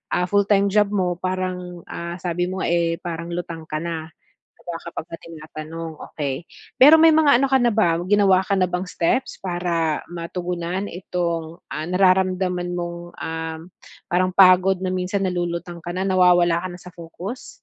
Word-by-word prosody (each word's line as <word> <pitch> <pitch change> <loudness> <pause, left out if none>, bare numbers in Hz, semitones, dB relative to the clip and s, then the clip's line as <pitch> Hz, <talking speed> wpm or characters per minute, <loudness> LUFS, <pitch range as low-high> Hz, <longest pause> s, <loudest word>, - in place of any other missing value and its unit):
ah, 180 - +1
full-time 200 0 +3
job 210 0 +4
mo 180 -3 0
parang, 180 -1 -4
ah, 170 0 -5
sabi 175 0 -1
mo 185 +1 -3
nga, - - 0
eh, 170 -1 +1
parang 170 -1 -4
lutang 170 -2 -5
ka 155 - -3
na, 165 -2 -4 0.5
'di - - -25
ba - - -5
kapagka 165 0 -6
tinatanong, 160 0 -8 0.2
okey. 145 +2 -4 0.3
Pero 295 +5 +10
may 325 0 +7
mga 300 -5 +5
ano 275 - +2
ka 265 - +5
na 240 - +4
ba, 170 -6 +3
ginawa 200 -2 +4
ka 195 +1 -1
na 185 - +3
bang 180 +1 -3
steps 180 +12 0
para 175 -4 -1
matugunan 175 +2 -4
itong, 170 -2 -3
ah, 155 - -4
nararamdaman 185 0 +2
mong, 175 -1 -4 0.2
um, 160 0 -4 0.5
parang 185 0 +2
pagod 185 0 +6
na 185 - -1
minsan 185 +2 -1
nalulutang 175 -1 -3
ka 175 - -4
na, 185 - -2
nawawala 175 -2 +4
ka - - -1
na 175 - -10
sa 180 - -11
focus? 175 +8 -8
180 Hz, 170 wpm, -22 LUFS, 170-185 Hz, 0.5 s, Pero